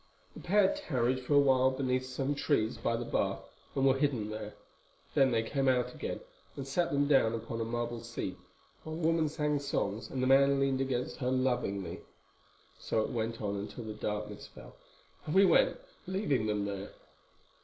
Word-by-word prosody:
The - - -10
pair 195 +1 +3
tarried 130 -2 0
for 130 +3 0
a - - +8
while 130 -2 +4
beneath 130 -1 -1
some 135 +2 -1
trees 140 -6 +1
by 115 - -1
the 120 - -4
bath - - -1 0.3
and 135 - +2
were 135 0 +4
hidden 125 -8 0
there. 110 -1 -6 0.6
Then 135 -1 +5
they 115 -2 +1
came 135 +4 -1
out 125 -1 +2
again - - -5 0.3
and 135 -1 -6
sat 170 +6 0
them 140 0 +2
down 130 -6 +4
upon 115 0 -4
a - - -1
marble 120 0 -3
seat, 115 -5 -5 0.5
while 155 0 -5
the 165 0 -2
woman 165 -2 +2
sang 150 -1 0
songs 110 -6 -2
and 130 -1 -2
the - - +3
man 140 +1 +5
leaned 135 -1 +1
against 130 -2 -2
her 125 -2 -1
lovingly. 125 -8 -1 0.8
So 110 - 0
it - - -4
went 115 -1 -3
on 100 -1 -1
until 105 +4 -6
the 110 -1 -5
darkness 105 0 -4
fell, - - -14 0.5
and 150 - -2
we 195 +1 +7
went, - - +4 0.3
leaving 180 - 0
them 105 -1 0
there. 100 0 -5
130 Hz, 185 wpm, -31 LUFS, 115-140 Hz, 0.8 s, a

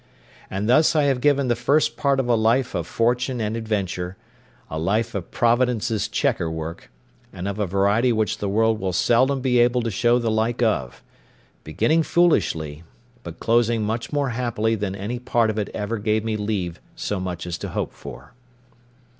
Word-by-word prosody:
And 100 +2 -3
thus 155 +7 +4
I 150 - +4
have 135 -3 +1
given 140 -1 +3
the 120 - +2
first 140 +6 +2
part 140 -2 +1
of 130 - 0
a 120 - +3
life 115 +3 +2
of 85 -1 -3
fortune 125 +4 0
and 110 0 -2
adventure—a 110 -1 -5
life 100 +7 0
of 95 -4 -5
Providence's 120 -2 +1
chequer 80 - 0
work, 80 +1 -6 0.4
and 95 0 -6
of 100 +1 -4
a 105 - 0
variety 100 +6 +2
which 110 -2 0
the 100 - -2
world 110 +2 +2
will 95 -1 -2
seldom 130 +8 +2
be 125 -2 +2
able 120 0 +3
to 115 - -2
show 120 +4 +3
the 115 -2 0
like 115 +2 0
of; 65 - -1 0.6
beginning 125 - +1
foolishly, 80 - +1 0.4
but 85 -6 -9
closing 115 -1 +2
much 110 +2 -3
more 145 -2 0
happily 115 -2 -1
than 100 -3 -2
any 105 +5 -4
part 120 -2 +1
of 110 - -3
it 105 - -2
ever 105 +1 -3
gave 110 +1 0
me 110 -1 -2
leave 100 -5 -3
so 105 - -3
much 90 -2 -4
as 85 -1 -4
to - - -5
hope - - -3
for. - - -11
110 Hz, 180 wpm, -23 LUFS, 100-125 Hz, 0.6 s, thus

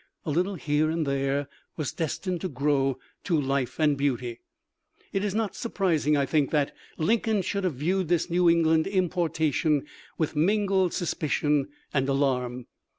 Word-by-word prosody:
A 155 - -1
little 180 +6 0
here 155 -1 +1
and 160 0 0
there 140 0 0 0.3
was 155 -5 -2
destined 170 +2 -2
to 185 - -2
grow 135 -1 +1 0.3
to 170 -5 +1
life 135 -1 -1
and 150 -2 +3
beauty. 125 -4 -1 0.7
It 195 - 0
is 205 -1 -1
not 220 -2 -1
surprising, 165 - +1
I 140 - +2
think, 145 -2 +1
that 145 -3 +1 0.2
Lincoln 215 +3 +1
should 200 +2 -2
have 175 -6 0
viewed 180 +6 0
this 175 0 +1
New 175 0 +3
England 160 -1 +3
importation 165 -6 +1 0.3
with 160 -1 -1
mingled 190 +2 +2
suspicion 150 -4 0 0.3
and 135 -1 +1
alarm. 125 -3 0
155 Hz, 150 wpm, -27 LUFS, 140-180 Hz, 0.7 s, and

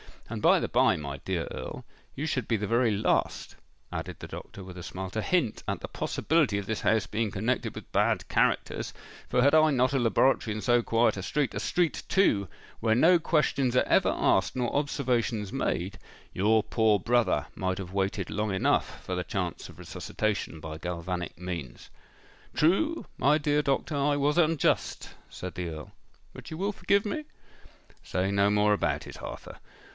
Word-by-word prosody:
And, - - -4
by - - +5
the - - -2
bye, - - +4
my 70 -2 -5
dear 85 +3 -3
Earl, 65 - -6 0.3
you 145 - -3
should 130 -7 -1
be 115 - +1
the 105 -1 -2
very 115 +3 +2
last," 105 0 0 0.3
added - - -5
the - - -8
doctor, 100 - -9
with 90 -1 -10
a - - -6
smile, 95 +2 -6
"to 110 - -2
hint 170 -5 0
at - - -2
the - - -6
possibility 150 -10 +1
of 100 - -3
this 110 +1 -3
house 110 -2 +2
being 110 0 -1
connected 115 +6 -1
with - - -10
bad - - +1
characters; - - 0 0.4
for 125 - +3
had 140 +2 +5
I 155 0 +6
not 130 0 +2
a 135 - +2
laboratory 120 -2 +2
in 110 - -4
so 120 0 +3
quiet 115 -1 +2
a - - -3
street—a 135 +7 -1
street, 175 -3 0
too, 105 - +3 0.3
where 110 -1 +2
no 170 +8 +5
questions 140 -6 +1
are - - +5
ever - - +3
asked - - +2
nor 125 -2 -1
observations 125 -7 0
made—your 100 +3 -1
poor 110 -2 +3
brother 120 +4 +1
might 95 0 -2
have 95 -1 -7
waited 100 -1 -1
long 105 -1 -1
enough 95 - 0
for 95 - -3
the 90 -1 -3
chance 90 -3 -3
of - - -14
resuscitation 105 -7 -3
by 80 0 -6
galvanic 85 +1 -4
means." 85 -8 -6 0.7
"True, 300 - +2
my 145 +3 +4
dear 150 -1 +1
doctor—I 145 0 0
was 145 +2 +1
unjust," 165 -3 +1 0.2
said 90 -1 -7
the 90 -1 -3
Earl. 80 -2 -8 0.4
"But - - -10
you 160 - -6
will 200 +4 0
forgive 200 0 +1
me?" 300 +9 -3 0.8
"Say 95 +2 -1
no 100 0 +3
more 105 0 +3
about 105 - 0
it, - - -10
Arthur. - - -8
110 Hz, 180 wpm, -28 LUFS, 95-140 Hz, 0.8 s, I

